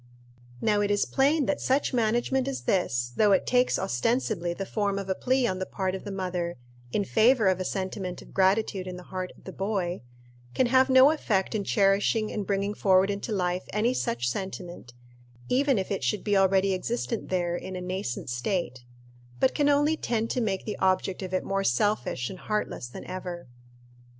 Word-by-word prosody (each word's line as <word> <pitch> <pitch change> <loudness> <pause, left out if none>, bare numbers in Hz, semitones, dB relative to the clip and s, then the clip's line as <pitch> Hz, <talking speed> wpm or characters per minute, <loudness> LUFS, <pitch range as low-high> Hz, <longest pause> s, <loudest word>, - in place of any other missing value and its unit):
Now 210 -1 +2
it 205 - 0
is 205 0 +2
plain 285 +2 +2
that 290 - -1
such 270 +1 +1
management 240 +3 +1
as 270 -1 -3
this, 120 -10 0
though 210 -2 +4
it 190 - +2
takes 250 0 +2
ostensibly 175 - 0
the 195 +3 -4
form 200 -1 -1
of 195 -1 -5
a - - +3
plea 255 +5 +1
on 185 -4 -1
the 185 - -2
part 190 -1 -2
of 190 - -6
the 205 - -5
mother 180 -3 -3 0.3
in 205 - 0
favor 225 0 +4
of 185 -1 +2
a - - -1
sentiment 185 -1 -4
of - - -14
gratitude 190 0 +1
in 180 -1 -6
the 180 - -10
heart 185 -1 -3
of - - -20
the 190 - -8
boy, 190 -3 -2 0.5
can 260 - +3
have 260 +2 +4
no 260 +2 +7
effect 210 -12 0
in 215 -2 -1
cherishing 205 +2 +2
and 205 -3 -4
bringing 200 0 0
forward 190 -1 +3
into 200 +3 -4
life 180 -2 -1
any 225 +4 +2
such 120 - -1
sentiment, 175 -5 -5 0.5
even 270 0 +3
if 190 0 -2
it 195 - -2
should 210 - 0
be 205 -1 +1
already 195 0 +3
existent 230 +4 -3
there 175 -2 0
in 185 +1 -6
a - - -4
nascent 180 -10 -4
state; 125 +1 -2 0.5
but 260 - +3
can 290 -1 +2
only 290 +2 +3
tend 230 -6 -2
to 250 - 0
make 195 -4 -1
the 210 - -4
object 190 0 +1
of 185 -1 -5
it 185 - 0
more 195 0 -1
selfish 130 - 0
and 185 - -8
heartless 210 - -3
than 120 - -9
ever. 180 -3 -6
195 Hz, 195 wpm, -27 LUFS, 185-225 Hz, 0.5 s, no